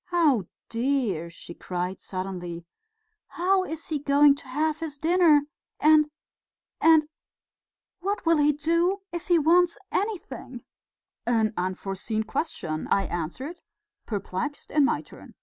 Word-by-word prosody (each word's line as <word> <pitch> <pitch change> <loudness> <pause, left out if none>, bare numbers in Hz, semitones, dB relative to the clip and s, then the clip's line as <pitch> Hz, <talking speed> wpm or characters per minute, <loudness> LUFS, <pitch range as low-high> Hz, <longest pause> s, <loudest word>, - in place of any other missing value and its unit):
Oh, 300 - +3 0.2
dear!" 230 - -1
she 170 0 -11
cried 180 +2 -4
suddenly, 180 -3 -5 0.6
"how 375 +2 +1
is 320 -3 -6
he 305 -2 -1
going 285 0 +5
to 275 - -11
have 305 +4 -1
his 310 -3 -5
dinner... 325 -1 +5 0.4
and... 305 0 +5 0.7
and... 320 -1 +6 0.9
what 400 +1 -2
will 330 0 +4
he 295 0 +4
do... 335 +6 +1
if 345 -1 -5
he 350 - +5
wants 335 +3 +4
anything?" 345 - -4 0.6
"An 225 -2 +2
unforeseen 195 +4 -2
question," 175 - -3
I 195 - +3
answered, 220 - -5 0.5
perplexed 205 +6 -4
in 295 -1 +4
my - - 0
turn. - - -15
290 Hz, 125 wpm, -26 LUFS, 195-325 Hz, 0.9 s, and